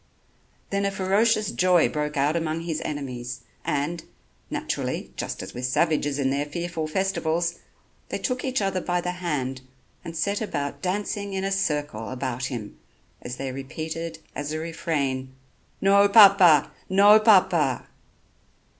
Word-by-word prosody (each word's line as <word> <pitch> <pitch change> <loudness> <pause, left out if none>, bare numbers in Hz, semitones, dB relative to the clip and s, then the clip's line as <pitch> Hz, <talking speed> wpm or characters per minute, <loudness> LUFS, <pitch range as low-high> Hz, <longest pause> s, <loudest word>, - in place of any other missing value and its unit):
Then 200 0 0
a 200 - +2
ferocious 205 +3 +1
joy 180 -2 +4
broke 150 0 -3
out 145 +3 +2
among 165 -1 -1
his 165 -2 -3
enemies, 125 -4 -5 0.2
and, 155 +4 -2 0.5
naturally, - - -3
just - - -4
as - - -9
with 125 +1 -4
savages 145 0 +1
in 135 -2 +1
their 140 +2 -1
fearful 170 0 -3
festivals, 170 -1 -1 0.5
they - - -2
took 250 -1 -2
each 260 -5 0
other 190 -1 0
by 175 0 0
the 180 0 -2
hand 145 -8 -3 0.4
and 165 -1 -7
set 200 +5 0
about 145 -9 -3
dancing 200 +1 -2
in 190 0 -2
a 195 - -1
circle 150 - -1
about 130 -1 -3
him 120 -6 -6 0.4
as 125 - -6
they 135 -1 -4
repeated 160 +5 -5 0.2
as 145 0 -4
a 155 - -2
refrain: 140 -5 -2 0.5
"No 200 +1 +5
Papa! 195 -8 +7 0.2
No 205 +3 +7
Papa!" 180 - +4
165 Hz, 145 wpm, -25 LUFS, 140-195 Hz, 0.5 s, Papa